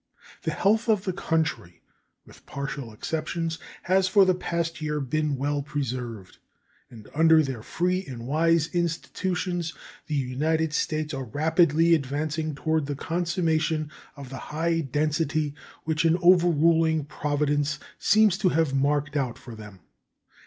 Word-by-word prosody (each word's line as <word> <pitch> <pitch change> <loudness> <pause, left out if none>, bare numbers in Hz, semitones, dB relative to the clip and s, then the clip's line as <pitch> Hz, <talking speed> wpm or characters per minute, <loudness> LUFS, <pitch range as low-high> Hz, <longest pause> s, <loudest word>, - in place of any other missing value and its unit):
The - - -2
health 220 +4 +1
of 210 -4 +3
the 185 - -2
country, 160 - -2 0.4
with - - -18
partial 140 -3 -5
exceptions, 160 +7 -3 0.2
has 185 +1 +3
for 195 +1 +5
the 185 - +4
past 170 -2 -3
year 150 -1 -1
been 150 +2 -1
well 145 +2 -1
preserved, 125 -8 -5 0.5
and 110 -3 -13
under 160 0 +5
their 130 -5 -4
free 180 - -1
and 120 -3 -7
wise 160 +3 +2
institutions 175 0 -2 0.3
the 150 - -2
United 150 +4 0
States 155 0 -1
are 135 -1 -4
rapidly 160 +5 +3
advancing 155 +1 -1
toward 160 0 0
the 145 - -3
consummation 160 -1 -1 0.2
of 140 -3 -9
the 135 - -7
high 165 +2 0
destiny 150 +1 0 0.3
which 155 0 0
an 165 +1 +4
overruling 165 -3 +4
Providence 145 0 -1 0.2
seems 210 -2 +4
to 195 -4 +3
have 160 -4 +1
marked 145 +2 +1
out 130 -5 -1
for 120 - -11
them. 105 -4 -11
155 Hz, 140 wpm, -26 LUFS, 140-165 Hz, 0.5 s, for